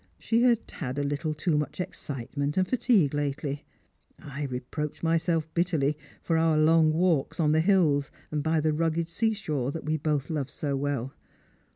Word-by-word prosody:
She 230 +1 +1
had 240 -2 +4
had 135 -3 -5
a 145 - 0
little 145 +2 -2
too 150 0 +1
much 150 +2 -4
excitement 145 -5 -4
and 185 0 +3
fatigue 220 - +3
lately. 145 0 -2 0.5
I 140 +1 -6
re 125 -2 -3
23roached 150 +5 -5
myself 165 -1 +1
bitterly 160 -5 +1 0.3
for 165 -1 +1
our 160 -1 +3
long 160 0 +5
walks 165 -2 +1
on 150 -2 +3
the 160 +1 +4
hills 160 -7 +3 0.2
and 150 -1 -1
by 160 +1 +1
the 155 0 +1
rugged 165 +1 0
sea 220 +6 0
shore 150 - -2
we 155 +1 0
both 150 -1 -1
loved 145 -4 -2
so 140 -1 -3
well. 135 -2 -2
155 Hz, 175 wpm, -27 LUFS, 145-165 Hz, 0.5 s, long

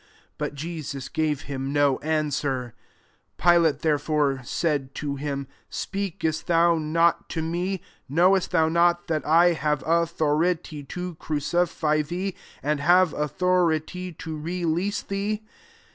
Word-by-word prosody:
But - - -3
Jesus 145 -3 -5
gave 155 -3 0
him 135 -1 -4
no 145 -2 +3
answer 145 -5 -1 0.6
10 175 - +5 0.2
Pilate, 150 - -2
[.there/bre']y 150 -3 +1
said 140 0 -1
tc 140 -2 -3
him, 140 -1 -3 0.2
" - - -41
Speakest 170 -5 -3
thou 170 -1 +4
not 165 +2 +2
to 160 - -2
me? 175 +3 -2 0.3
knowest 180 +6 +3
thou 160 -2 +3
not 170 +1 +3
that 155 -2 -1
i 170 +3 +5
have 150 -2 -1
authority 165 -1 +1
to 180 +4 -5
crucify 155 0 0
thecJ 180 +6 -3 0.3
and 150 +1 0
have 175 +3 +4
authority 180 +2 0
to 160 0 -6
releasi 175 +3 -1
thee?" 205 +2 -2
160 Hz, 130 wpm, -25 LUFS, 150-175 Hz, 0.6 s, 10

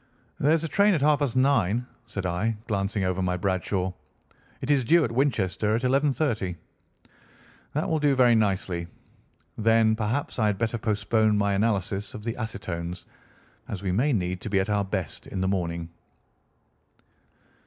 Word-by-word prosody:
"There 150 -1 +3
is 165 0 +2
a - - -1
train 200 +4 +3
at 155 - -1
half 150 0 +4
past 140 -5 -1
nine," 125 -4 +2 0.2
said 100 -4 -5
I, 105 +6 -1
glancing 100 -1 -1
over 95 0 0
my 90 -1 0
Bradshaw. 95 0 -1 0.7
"It - - -1
is 140 -3 +3
due 165 +7 +4
at 115 - -1
Winchester 110 -5 +1
at 120 - -2
11:30." 130 - +1 1.2
"That 150 - -1
will 160 - +1
do 145 -2 +3
very 125 -2 +5
nicely. 95 -5 0 0.7
Then 110 0 +4
perhaps 115 +5 -2
I 110 - +3
had 105 -2 0
better 115 +2 -1
postpone 110 0 +1
my 100 -1 +1
analysis 100 -1 -1
of 105 - -8
the 115 0 -2
acetones, 90 -6 -5 0.6
as 100 -1 -6
we 95 - 0
may 125 +11 +2
need 90 -5 -1
to - - -5
be 100 -1 +2
at 95 +2 -1
our 105 -1 +2
best 95 -4 -4
in 95 - -5
the 95 - 0
morning." 85 -3 -2
105 Hz, 165 wpm, -26 LUFS, 95-125 Hz, 1.2 s, very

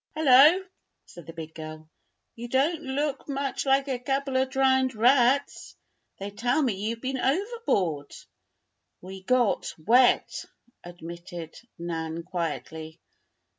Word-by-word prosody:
"Hullo!" 310 +5 +6 0.4
said 175 -3 -14
the 165 - -8
big 160 -1 -8
girl. 155 0 -9 0.5
"You 235 +1 -7
don't 285 +7 +1
look 280 0 -3
much 275 0 -3
like 270 +1 +3
a 260 -3 -2
couple 270 +1 -2
of 260 0 +2
drowned 265 -1 +2
rats. 250 +4 +2 0.4
They 200 +1 -6
tell 245 +7 0
me 245 -5 +1
you've 220 +4 -4
been 265 0 -3
overboard." 265 - -1 0.9
"We 190 +1 -10
got 245 +3 +1
wet," 240 +10 +3 0.4
admitted 170 -1 -9 0.2
Nan, 165 -1 -4
quietly. 160 -3 -5
240 Hz, 120 wpm, -26 LUFS, 170-270 Hz, 0.9 s, Hullo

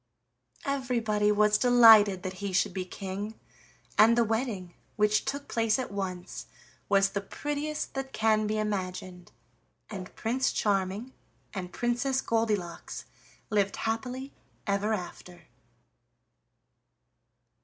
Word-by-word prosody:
Everybody 235 -6 +1
was 210 0 +4
delighted 225 -6 +7
that 185 - -3
he 200 -2 -3
should 185 - +2
be 185 0 -3
king, 195 +3 -6 0.6
and 230 +2 +7
the 235 - +5
wedding, 220 -6 -2 0.2
which 210 0 +2
took 280 +1 -3
place 225 -2 +1
at 255 -5 -4
once, 185 -3 -5 0.4
was 195 -1 +4
the 200 - -2
prettiest 295 +8 -4
that 270 0 -4
can 215 -2 +2
be 215 +1 -1
imagined, 185 -4 -4 0.6
and 185 -3 -7
Prince 250 +4 0
Charming 200 +4 -1 0.4
and 185 -3 -5
Princess 245 +4 0
Goldilocks 215 -8 -2 0.5
lived 200 -2 +2
happily 250 +4 -3 0.3
ever 200 +1 0
after. 180 -2 -9
210 Hz, 110 wpm, -29 LUFS, 195-235 Hz, 0.6 s, delighted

